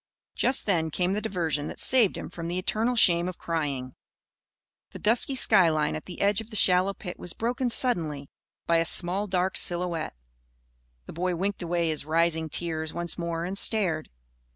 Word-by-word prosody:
Just 260 +1 +2
then 165 -6 0
came 180 +4 -1
the 210 - -2
diversion 165 -8 -2
that - - -8
saved 245 -7 +3
him - - -8
from 170 -1 -7
the 175 +1 -3
eternal 220 +6 -1
shame 175 -5 +3
of 185 - -9
crying. 140 -6 -4 1.0
The - - -7
dusky 235 +5 +2
skyline 165 -11 +3
at 155 - -7
the 180 - -8
edge 200 +1 +2
of 220 - -12
the 220 - -7
shallow 185 0 +4
pit 180 -4 -8
was 175 - -6
broken 245 +2 -2
suddenly 160 - 0 0.4
by 170 - +2
a 165 - +2
small 185 +4 +3
dark 185 0 -1
silhouette. 175 - -1 0.9
The - - -10
boy 180 +2 -2
winked 195 +3 -3
away 170 -1 -1
his 155 -2 0
rising 160 +1 0
tears 160 -1 -3
once 170 0 -2
more, 170 0 -3
and 185 +2 -5
stared. 195 -7 +1
175 Hz, 175 wpm, -26 LUFS, 165-200 Hz, 1.0 s, shallow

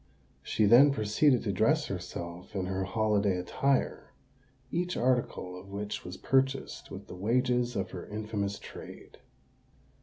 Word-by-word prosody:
She 110 - +1
then 125 +7 +8
proceeded 125 +3 +3
to 105 - 0
dress 145 - +2
herself 90 +1 -6
in 95 -2 -1
her 95 0 -2
holiday 105 -2 +1
attire, 135 +9 0 0.6
each 180 +1 -1
article 120 -7 0
of 90 +2 -11
which 100 +1 -4
was 90 +1 -7
purchased 135 0 0
with 95 +1 -8
the - - -10
wages 120 +5 +1
of 95 0 -2
her - - -7
infamous 105 -1 -3
trade. - - -11
105 Hz, 140 wpm, -30 LUFS, 95-125 Hz, 0.6 s, then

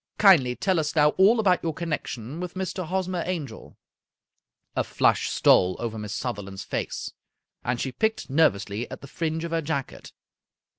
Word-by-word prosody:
Kindly 155 -12 +6
tell 190 0 +1
us 150 0 -2
now 150 -1 +5
all 195 +8 +4
about 185 -5 +3
your 165 -2 -2
connection 155 -5 -4
with 180 0 -5
Mr. 185 -1 -3
Hosmer 185 0 -1
Angel." 155 -11 -6 1.0
A - - +1
flush - - +2
stole 90 0 +4
over 115 -2 -4
Miss 105 -1 -5
Sutherland's 100 -6 -5
face, - - -4 0.5
and 125 0 -1
she 130 - -2
picked 220 - -1
nervously 115 -7 +1
at - - -8
the 140 - -10
fringe 160 +2 -3
of 170 - -4
her 165 0 0
jacket. 145 -3 -4
160 Hz, 160 wpm, -25 LUFS, 125-180 Hz, 1.0 s, Kindly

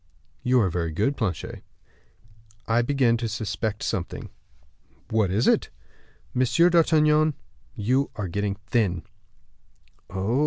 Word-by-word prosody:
"You 125 0 +3
are 95 - +2
very 85 -1 -2
good, 105 - 0
Planchet." 95 - -3 1.1
"I 115 +1 +3
begin 120 -2 +2
to 115 0 -2
suspect 110 0 -3
something." 90 -2 -3 0.8
"What 110 -4 +2
is 105 +6 +1
it?" - - +3 0.6
"Monsieur 165 +8 +3
d'Artagnan, 155 -2 +4 0.4
you 130 +7 +1
are 105 -4 -3
getting 100 +3 -2
thin." 100 -6 0 1.1
"Oh!" 100 +7 -1
115 Hz, 115 wpm, -25 LUFS, 100-135 Hz, 1.1 s, d'Artagnan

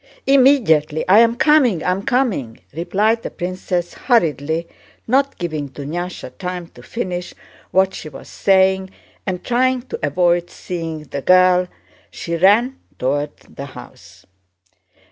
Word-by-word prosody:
"Immediately, 245 - +3
I'm 230 +5 +5
coming, 255 - +3
I'm 185 +2 0
coming!" 200 - -1
replied 210 +8 0
the - - -5
princess 180 -1 -3
hurriedly, 160 - 0 0.4
not 275 +4 +1
giving 155 -5 -4
Dunyásha 165 +7 -6
time 180 -1 -4
to - - -16
finish 180 -6 -5 0.3
what 190 0 +2
she 155 - -7
was 135 - -12
saying, 190 -1 +2 0.4
and 180 -2 -3
trying 255 +1 +1
to - - -7
avoid 175 +3 +1
seeing 165 -3 -6
the 140 -1 -6
girl 185 +2 +4 0.4
she 170 - -5
ran 215 +9 +3 0.2
toward 145 +3 -2
the 140 - -10
house. - - -14
180 Hz, 125 wpm, -19 LUFS, 160-225 Hz, 0.4 s, I'm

